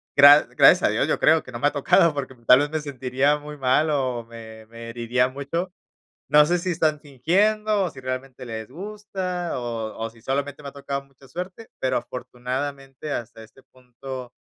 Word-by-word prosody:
gra 145 +1 +9
gracias - - +7
a - - +4
Dios, - - +1
yo - - 0
creo 160 +1 +4
que - - -12
no 120 - -6
me 145 - +3
ha - - +1
tocado, 160 +4 +4
porque 135 -2 -4
tal 125 - +8
vez 145 +1 -1
me 155 -1 -2
sentiría 135 0 0
muy 150 0 -9
mal 135 +4 +2
o 130 -5 -1
me 110 -1 -11
me 115 +1 -10
heriría 120 +2 0
mucho. 140 +7 -4 0.6
No 150 0 +7
sé 175 +2 +2
si, 180 +1 -2
están 155 -2 +1
fingiendo, 200 - +1
o 180 - -1
si 135 - -12
realmente 130 0 -5
les 110 -1 -6
gusta, 185 -1 -5
o 115 -2 -4
o 115 0 -3
si 115 0 -20
solamente 140 +3 -3
me 140 - -6
ha - - -16
tocado 140 0 -5
mucha 135 0 -21
suerte, 180 - -7
pero, 130 -1 0
afortunadamente, 135 +3 -5
hasta 115 -3 -5
este 110 +4 -18
punto, 130 0 -10
135 Hz, 195 wpm, -24 LUFS, 125-155 Hz, 0.6 s, gra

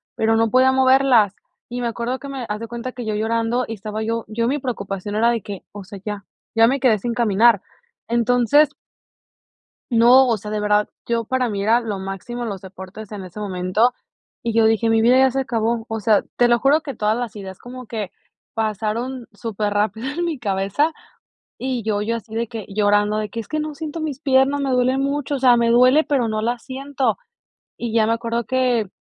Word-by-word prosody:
pero, 225 0 +2
no 225 0 +2
podía 260 +1 +5
moverlas. 260 -6 +4 0.4
Y 245 0 -4
me 240 - -1
acuerdo 235 +3 -3
que 280 - -8
me 265 -3 -5
haz 210 +1 -2
de 230 - -5
cuenta 240 +2 -6
que 245 -3 -6
yo 215 -1 -2
llorando 230 +3 0
y 225 - -4
estaba 215 +1 -5
yo 230 +1 -2
yo 230 +2 -1
mi 285 +4 0
preocupación 205 -5 -4
era 230 +2 +3
de 230 - -1
que, 195 -1 -8
o 205 -1 -8
sea, 200 +1 -10
ya 205 -1 -5 0.3
ya 225 0 +6
me 270 +2 +1
quedé 240 -5 +4
sin 235 +4 -2
caminar. 230 -2 +4 0.5
Entonces 245 +5 +3 1.2
no, 245 +3 +6
o 230 - +2
sea, 210 +1 -7
de 210 - -1
verdad, 210 0 +2 0.2
yo, 230 -1 0
para 255 +1 0
mí 200 -2 -3
era 230 +3 +4
lo 210 -4 -4
máximo 195 +6 -5
los 200 -5 -4
deportes 190 +2 -10
en 200 -3 -7
ese 185 +4 -9
momento, 195 +5 +1 0.5
y 230 - -1
yo 225 0 +4
dije: 225 +1 +2
"Mi 225 0 +3
vida 250 +3 +5
ya 265 0 +5
se 270 - 0
acabó". 230 -2 -1
O 225 -1 -3
sea, 210 -1 +3
te 245 - +4
lo 240 -1 +3
juro 290 +4 +4
que 280 -4 -7
todas 215 0 0
las 240 -4 -4
ideas 190 -2 -8
como 250 0 -10
que 210 -5 -4 0.4
pasaron 225 +3 -2
súper 210 -1 -3
rápido 220 +4 -1
en 340 +4 -2
mi 325 -4 -2
cabeza 200 +8 0 0.7
y 255 -3 -3
yo 210 -1 0
yo 230 +2 -1
así 220 0 -12
de 230 +1 -1
que 220 -3 -7
llorando 205 +1 +2
de 215 -1 -2
que 230 - -6
es 225 - -6
que 310 - -2
no 305 0 -3
siento 315 +1 -5
mis 290 -4 -4
piernas, 275 0 +3
me 270 -1 -1
duele 255 +1 +2
mucho, 280 +1 -1
o - - -3
sea, 250 -2 +6
me 235 0 +2
duele, 255 +6 +5
pero, 255 -6 +1
no 215 0 -1
la 235 +2 -1
siento. 270 +1 -2 0.6
Y 235 -2 -4
ya 220 -2 +4
me 225 - +2
acuerdo 230 0 -2
que, 250 -5 +1
230 Hz, 215 wpm, -21 LUFS, 215-255 Hz, 1.2 s, ya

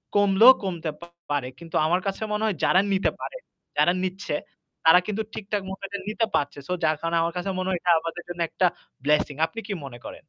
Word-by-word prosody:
কমলেও 205 +5 +8
কমতে 170 -4 -3 0.4
পারে। 140 -3 0
কিন্তু 170 -1 -9
আমার 175 +3 +2
কাছে 195 +3 -2
মনে 210 +1 -1
হয় 210 -4 +1
যারা 185 - +5
নিতে 190 - +2
পারে, - - -5 0.4
যারা 175 - +4
নিচ্ছে 185 -4 -2 0.5
তারা 160 +3 +8
কিন্তু 215 +1 -1
ঠিক-ঠাক 205 -1 -3
মতো 190 - -7
এটা 200 0 -5
নিতে 225 +1 +1
পারছে। 145 0 -1
সো 180 - -1
যার 155 0 +3
কারণে 165 0 0
আমার 170 0 0
কাছে 180 +2 -2
মনে 185 +1 -1
হয় 180 -2 0
এটা 175 - +3
আমাদের 165 +2 -6
জন্য 175 - -6
একটা 180 - +2 0.4
blessing। 150 -1 +2
আপনি 230 - -7
কি 205 - -2
মনে 120 -3 -9
করেন? - - -7
180 Hz, 210 wpm, -25 LUFS, 165-200 Hz, 0.5 s, কমলেও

